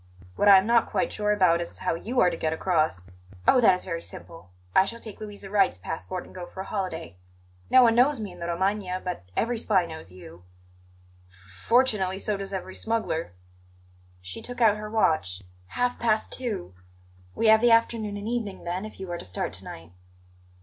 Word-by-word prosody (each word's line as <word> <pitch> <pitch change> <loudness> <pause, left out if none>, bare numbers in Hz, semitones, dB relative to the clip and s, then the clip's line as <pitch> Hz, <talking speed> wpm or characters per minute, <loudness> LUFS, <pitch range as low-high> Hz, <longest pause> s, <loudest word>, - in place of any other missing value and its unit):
What 205 - +2
I 195 - +10
am 190 - +3
not 235 0 +3
quite - - -1
sure 210 0 0
about 180 -5 +3
is 170 - -7
how 185 - -1
you 230 +10 -2
are 180 - +4
to - - -3
get 160 -1 -1
across." 160 - 0 0.4
"Oh, 255 - +6
that 190 -5 +6
is 180 - -6
very 170 -2 -3
simple! 165 - -12 0.3
I - - +7
shall 230 +4 -6
take 220 -3 -8
Louisa 205 -2 -8
Wright's 195 - +3
passport 175 - -5
and - - -15
go 180 -1 -7
for 190 - -8
a - - -7
holiday. 165 - -4 0.5
No 255 - +7
one 230 -1 +5
knows 255 +3 +4
me 210 -3 -5
in 175 - -13
the 170 - -4
Romagna, 185 +1 -1
but 180 - -5
every 235 0 0
spy 195 -6 +2
knows 160 - -9
you." 90 -1 -13 0.9
"F 90 0 -19
fortunately, 215 -6 +3
so 210 +1 -1
does 195 0 -6
every 190 -1 -5
smuggler." 215 - -2 0.9
She 95 +1 -7
took 245 0 -8
out 220 -3 +5
her 210 0 -6
watch. 155 - +1 0.2
"Half 245 - -1
past 220 -2 +1
two. 215 - -4 0.6
We - - -1
have 220 0 +7
the 240 - +5
afternoon 230 -2 +2
and 205 +1 -6
evening, 225 -5 -3
then, 180 +4 -3
if 215 - -11
you 190 -2 -6
are 175 - -4
to - - -7
start 90 - -3
to - - -10
night." 80 +1 -10
195 Hz, 205 wpm, -26 LUFS, 170-220 Hz, 0.9 s, I